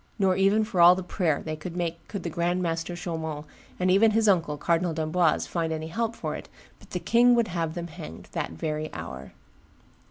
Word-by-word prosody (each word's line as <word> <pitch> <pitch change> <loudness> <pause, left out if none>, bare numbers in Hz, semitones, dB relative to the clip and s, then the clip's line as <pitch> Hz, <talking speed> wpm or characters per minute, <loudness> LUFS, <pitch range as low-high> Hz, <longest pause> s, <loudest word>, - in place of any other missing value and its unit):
'Nor 190 -3 +3
even 195 +3 +3
for 210 -5 0
all 175 +1 +9
the 190 - -4
prayer 175 -4 0
they 155 -1 -3
could 170 +3 -7
make 170 -1 -3
could 200 -4 -5
the 170 - -2
grand 175 +2 0
master 165 +1 -2
Chaumont, 160 -3 -4 0.3
and 185 0 +2
even 210 +4 +6
his 220 0 +2
uncle, 165 -6 +2
Cardinal 170 +2 0
d'Amboise, 160 +1 +1
find 165 -2 -2
any 160 0 -4
help 230 +6 -2
for - - -4
it, - - -9 0.3
but - - -18
the - - -3
king 240 +1 +4
would 235 -3 +2
have 165 -2 -2
them 170 -1 -4
hanged 80 - -9
that - - -2
very 155 - -4
hour." 70 -5 -7
170 Hz, 210 wpm, -26 LUFS, 160-190 Hz, 0.3 s, all